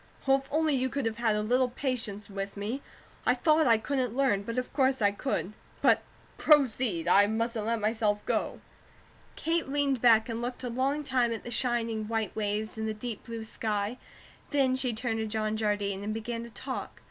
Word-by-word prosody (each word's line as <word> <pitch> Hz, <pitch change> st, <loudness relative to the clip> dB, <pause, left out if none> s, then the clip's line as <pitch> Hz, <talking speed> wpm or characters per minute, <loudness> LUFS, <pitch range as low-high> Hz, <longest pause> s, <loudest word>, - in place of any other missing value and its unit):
Oh, 270 Hz, -, +6 dB
if 270 Hz, 0 st, -10 dB
only 310 Hz, 0 st, +2 dB
you 260 Hz, -1 st, +1 dB
could 280 Hz, -1 st, -2 dB
have 225 Hz, -1 st, -1 dB
had 225 Hz, -2 st, +2 dB
a 210 Hz, -, 0 dB
little 250 Hz, +3 st, +2 dB
patience 235 Hz, -6 st, -2 dB
with 195 Hz, 0 st, -5 dB
me. 220 Hz, +7 st, -3 dB, 0.4 s
I 250 Hz, -, +3 dB
thought 310 Hz, +3 st, +3 dB
I 230 Hz, -1 st, +6 dB
COULDN'T 250 Hz, 0 st, -1 dB
learn, 265 Hz, -8 st, +2 dB
but 230 Hz, +4 st, -5 dB
of 255 Hz, -, -2 dB
course 265 Hz, -1 st, +2 dB
I 205 Hz, -2 st, +4 dB
COULD. 205 Hz, -2 st, -2 dB, 0.3 s
But, -, -, +4 dB, 0.4 s
proceed! 250 Hz, -, +3 dB
I 200 Hz, +3 st, +6 dB
mustn't 225 Hz, 0 st, -1 dB
let 230 Hz, 0 st, +1 dB
myself 215 Hz, -1 st, 0 dB
go." -, -, -1 dB, 0.7 s
Kate 330 Hz, -3 st, -1 dB
leaned 275 Hz, -3 st, +1 dB
back 225 Hz, -2 st, +6 dB
and 230 Hz, -1 st, -3 dB
looked 245 Hz, +1 st, -4 dB
a 250 Hz, -, -2 dB
long 270 Hz, +5 st, 0 dB
time 250 Hz, -4 st, +1 dB
at 225 Hz, -, -4 dB
the 240 Hz, -, -7 dB
shining 230 Hz, -3 st, 0 dB
white 220 Hz, -3 st, -2 dB
waves 215 Hz, +1 st, -2 dB
and 220 Hz, -, -1 dB
the 215 Hz, -, -2 dB
deep 225 Hz, 0 st, -6 dB
blue 230 Hz, -1 st, -5 dB
sky, 215 Hz, +1 st, -2 dB, 0.5 s
then 270 Hz, -3 st, +2 dB
she 260 Hz, -1 st, 0 dB
turned 225 Hz, 0 st, -2 dB
to 220 Hz, -, -1 dB
John 215 Hz, 0 st, -1 dB
Jardine, 205 Hz, -2 st, -1 dB
and 215 Hz, +1 st, -3 dB
began 230 Hz, +1 st, -4 dB
to -, -, -10 dB
talk. 255 Hz, +4 st, -6 dB
230 Hz, 200 wpm, -29 LUFS, 215-260 Hz, 0.7 s, Oh